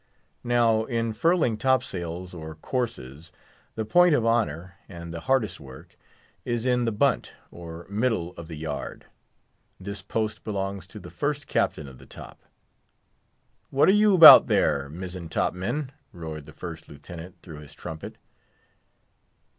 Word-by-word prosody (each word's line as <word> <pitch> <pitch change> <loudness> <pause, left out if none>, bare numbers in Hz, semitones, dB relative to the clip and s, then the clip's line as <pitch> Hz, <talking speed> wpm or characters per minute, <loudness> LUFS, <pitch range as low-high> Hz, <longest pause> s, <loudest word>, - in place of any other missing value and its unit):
Now, 115 -2 +2
in 115 -2 -2
furling 155 -2 +1
top 130 +2 +2
sails 90 0 -6
or 80 -2 -8
courses, 85 - -5 0.4
the 110 - -3
point 175 +5 +5
of 115 - 0
honour, 95 -6 0 0.2
and 85 -2 -9
the 85 - -5
hardest 115 -3 0
work, 75 +5 -13 0.5
is 120 -1 -2
in 125 -1 +2
the 115 - 0
bunt, 125 +4 0 0.2
or 85 0 -10
middle 100 -4 -1
of 85 - -9
the 80 - -8
yard; 75 -1 -6 0.7
this 100 +2 -7
post 110 -1 -3
belongs 100 -2 -4
to - - -11
the - - -12
first - - -2
captain 70 - -1
of 65 -2 -13
the - - -16
top. - - -12 1.3
"What 135 - +3
are - - +8
you 210 -1 +4
'bout 165 - +11
there, 70 0 +1
mizzen 90 +1 -7
top - - 0
men?" 130 +10 -3 0.2
roared 80 -3 -8
the - - -11
First - - -9
Lieutenant, 85 +5 -11
through 80 -4 -10
his 75 0 -13
trumpet. 80 -1 -8
95 Hz, 150 wpm, -25 LUFS, 80-120 Hz, 1.3 s, bout